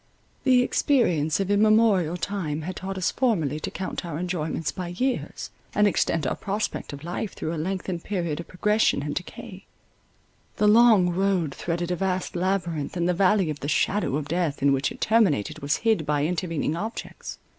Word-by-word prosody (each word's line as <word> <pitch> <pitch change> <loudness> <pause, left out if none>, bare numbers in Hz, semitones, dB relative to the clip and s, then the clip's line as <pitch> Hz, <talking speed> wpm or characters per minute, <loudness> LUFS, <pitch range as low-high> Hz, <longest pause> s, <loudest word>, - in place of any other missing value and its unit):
The 255 -2 +5
experience 180 - +2
of 195 0 -1
immemorial 205 -5 +4
time 170 -4 -3
had 185 +3 -5
taught 190 0 -5
us 185 - 0
formerly 165 - 0
to - - -4
count 190 - -5
our 165 -4 -5
enjoyments 165 -3 -2
by 185 -2 -5
years, 250 +10 -3 0.2
and 210 - +4
extend 165 -5 +1
our - - 0
prospect 205 +1 -3
of 140 0 -9
life 180 +5 -4
through 160 - -4
a 155 - -2
lengthened 185 -1 -3
period 170 -6 -2
of 170 - -7
progression 210 -4 +1
and 145 0 -3
decay; 190 +2 -7 0.9
the 210 - +3
long 215 -5 +6
road 180 -5 0
threaded 175 +1 -3
a - - +1
vast 185 +1 -2
labyrinth, 175 -4 -1
and 170 0 +1
the 180 - +2
Valley 190 -2 +3
of 150 - -6
the 140 - -5
Shadow 185 -1 +1
of 145 -1 -3
Death, 165 -3 -1
in 140 -1 +5
which 135 +1 0
it - - -11
terminated, 205 - +2
was 145 +1 0
hid 220 -8 +3
by 145 -1 0
intervening 165 -2 -1
objects. 220 +7 -6
180 Hz, 180 wpm, -25 LUFS, 155-200 Hz, 0.9 s, long